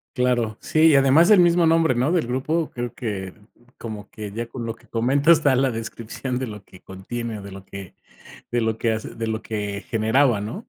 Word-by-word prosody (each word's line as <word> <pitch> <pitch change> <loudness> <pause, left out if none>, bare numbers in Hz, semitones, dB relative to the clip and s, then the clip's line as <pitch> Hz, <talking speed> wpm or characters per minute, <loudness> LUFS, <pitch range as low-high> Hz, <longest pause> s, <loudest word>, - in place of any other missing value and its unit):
Claro, 120 -4 0
sí, 160 +1 +3
y 155 - +5
además 140 +7 +5
el 210 - +7
mismo 175 -1 +4
nombre, 160 -4 +3
¿no?, 125 +6 +1
del 175 -8 +1
grupo. 155 +6 -1
Creo 120 -1 -4
que, 95 -5 -5 0.4
como 105 -3 -8
que 105 -2 -8
ya 115 +2 -4
con 115 0 -6
lo 115 - -3
que - - -24
comentas, 140 +8 +3
está 145 -4 +2
la 130 0 +2
descripción 115 +2 -5
de 130 - -3
lo 105 -2 -9
que 95 - -17
contiene 110 +4 -6
o 100 - -10
de 100 - -9
lo 95 0 -10
que 100 -2 -10 0.6
de 120 - +1
lo 110 0 -1
que 115 -1 +1
hace, 110 +1 -4
de 115 0 -4
lo 110 0 -3
que 105 -2 -4
generaba, 115 0 +2
¿no? 145 - -7
120 Hz, 220 wpm, -23 LUFS, 110-135 Hz, 0.6 s, el